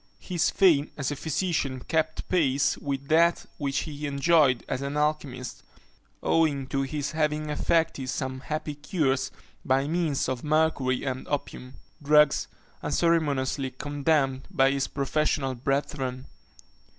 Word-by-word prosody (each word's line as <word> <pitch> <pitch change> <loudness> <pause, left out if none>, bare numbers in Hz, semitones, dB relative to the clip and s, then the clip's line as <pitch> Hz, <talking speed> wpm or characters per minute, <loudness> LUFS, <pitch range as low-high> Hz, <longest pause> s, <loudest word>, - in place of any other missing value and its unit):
His 175 -3 0
fame 160 -7 +4
as 145 -1 -2
a - - -2
physician 145 -4 -1
kept 160 -1 -1
pace 145 -6 +2
with 140 -1 -4
that 170 +2 +4
which 140 -2 -1
he 150 -1 -5
enjoyed 140 -3 +3
as 130 - -2
an 140 +1 -3
alchymist, 150 -4 -2 0.6
owing 150 -5 +2
to 135 +1 0
his 145 +1 -3
having 150 -1 -1
effected 150 -3 0
some 130 0 -3
happy 155 +2 -4
cures 140 -3 0 0.3
by 135 +2 +1
means 160 -3 0
of 130 -2 -3
mercury 150 -4 +1
and 130 -1 -4
opium, 130 -2 -4 0.3
drugs 150 0 +4 0.3
unceremoniously 145 -5 +1
condemned 140 0 0
by 135 0 +3
his 140 -1 0
professional 140 -1 0
brethren. 130 0 -2
145 Hz, 125 wpm, -27 LUFS, 135-155 Hz, 0.6 s, fame